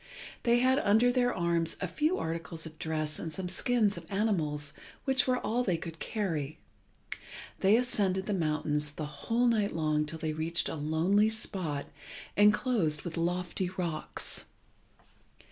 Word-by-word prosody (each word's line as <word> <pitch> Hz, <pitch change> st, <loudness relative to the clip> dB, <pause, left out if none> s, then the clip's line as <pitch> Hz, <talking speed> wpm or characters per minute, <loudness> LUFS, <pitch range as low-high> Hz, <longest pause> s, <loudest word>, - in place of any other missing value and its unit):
They 240 Hz, 0 st, +3 dB
had 260 Hz, +2 st, +4 dB
under 225 Hz, +1 st, +4 dB
their 245 Hz, -1 st, +2 dB
arms 170 Hz, -1 st, +1 dB
a 185 Hz, -, -2 dB
few 310 Hz, -, +1 dB
articles 165 Hz, 0 st, -4 dB
of 160 Hz, -1 st, -10 dB
dress 155 Hz, -1 st, -2 dB
and 165 Hz, -, -4 dB
some 185 Hz, +3 st, -3 dB
skins 210 Hz, +1 st, +2 dB
of 165 Hz, -1 st, -9 dB
animals, 155 Hz, -9 st, 0 dB, 0.3 s
which 265 Hz, 0 st, +3 dB
were 255 Hz, -1 st, +3 dB
all 240 Hz, +2 st, 0 dB
they 180 Hz, -7 st, +1 dB
could 165 Hz, 0 st, -8 dB
carry. 160 Hz, -9 st, -2 dB, 1.0 s
They 200 Hz, +3 st, +5 dB
ascended 195 Hz, -6 st, 0 dB
the 210 Hz, -, -1 dB
mountains 150 Hz, -3 st, +1 dB
the 155 Hz, -, -4 dB
whole 230 Hz, +11 st, -1 dB
night 215 Hz, -6 st, +2 dB
long 155 Hz, -1 st, +1 dB
till 160 Hz, +1 st, -5 dB
they 155 Hz, -1 st, -2 dB
reached 160 Hz, +2 st, 0 dB
a -, -, -3 dB
lonely 165 Hz, +8 st, +2 dB
spot 180 Hz, -9 st, -3 dB, 0.5 s
enclosed 205 Hz, -, +3 dB
with 170 Hz, -, -5 dB
lofty 175 Hz, +1 st, -1 dB
rocks. 165 Hz, -4 st, -1 dB
175 Hz, 150 wpm, -30 LUFS, 160-215 Hz, 1.0 s, They